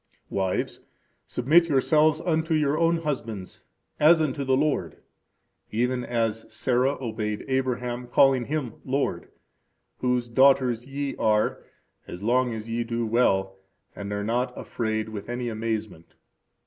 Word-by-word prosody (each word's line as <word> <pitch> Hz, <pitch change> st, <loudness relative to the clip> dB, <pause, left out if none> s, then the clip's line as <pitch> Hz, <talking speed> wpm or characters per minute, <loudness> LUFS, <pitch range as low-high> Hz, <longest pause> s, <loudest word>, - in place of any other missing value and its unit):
Wives, 95 Hz, -1 st, -1 dB, 0.5 s
submit 160 Hz, +7 st, +3 dB
yourselves 155 Hz, +2 st, +3 dB
unto 160 Hz, -1 st, 0 dB
your 150 Hz, -1 st, +2 dB
own 165 Hz, +1 st, +2 dB
husbands, 115 Hz, -, -5 dB, 0.3 s
as 160 Hz, +2 st, +6 dB
unto 145 Hz, -2 st, -1 dB
the 130 Hz, -1 st, +2 dB
Lord, 140 Hz, -, 0 dB, 0.7 s
even 125 Hz, +3 st, 0 dB
as 115 Hz, -2 st, -2 dB
Sarah 130 Hz, +2 st, +1 dB
obeyed 110 Hz, -4 st, -3 dB
Abraham, 125 Hz, -2 st, -1 dB
calling 130 Hz, 0 st, +4 dB
him 140 Hz, -6 st, -4 dB
lord; 135 Hz, +1 st, -2 dB, 0.7 s
whose 125 Hz, -1 st, 0 dB
daughters 125 Hz, -1 st, +3 dB
ye 140 Hz, 0 st, -3 dB
are, 105 Hz, -1 st, +1 dB, 0.5 s
as 90 Hz, +3 st, -8 dB
long 125 Hz, +2 st, +2 dB
as 110 Hz, -1 st, -6 dB
ye 115 Hz, +1 st, -1 dB
do 115 Hz, 0 st, -2 dB
well, 95 Hz, -4 st, +1 dB, 0.4 s
and 100 Hz, 0 st, -6 dB
are 105 Hz, 0 st, -2 dB
not 120 Hz, +4 st, 0 dB
afraid 110 Hz, -1 st, -2 dB
with 105 Hz, 0 st, -7 dB
any 120 Hz, 0 st, -2 dB
amazement. 110 Hz, -6 st, -4 dB
125 Hz, 130 wpm, -26 LUFS, 110-140 Hz, 0.7 s, as